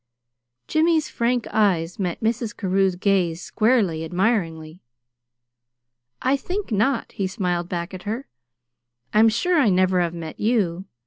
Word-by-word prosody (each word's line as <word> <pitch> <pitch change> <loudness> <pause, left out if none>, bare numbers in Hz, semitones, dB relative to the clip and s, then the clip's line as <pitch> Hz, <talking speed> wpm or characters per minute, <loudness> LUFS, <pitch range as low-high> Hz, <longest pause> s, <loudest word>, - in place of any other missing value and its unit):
Jimmy's 315 -1 +2
frank 240 0 0
eyes 180 -5 +1
met 180 -3 -2
Mrs. 225 0 -1
Carew's 190 -1 +1
gaze 180 -3 +1
squarely, 215 -8 +1
admiringly. 170 -3 -1 1.4
"I 260 +2 +3
think 370 - -4
not," 225 +4 +1
he 195 - -2
smiled 180 -3 -2
back 175 +1 -4
at 185 - -7
her. 225 +7 -4 0.9
"I'm 220 +1 +6
sure 330 +10 +1
I 250 -7 +4
never 185 -1 +3
have 170 -1 -1
met 165 -2 -7
you. 195 -6 0
195 Hz, 130 wpm, -23 LUFS, 175-235 Hz, 1.4 s, I'm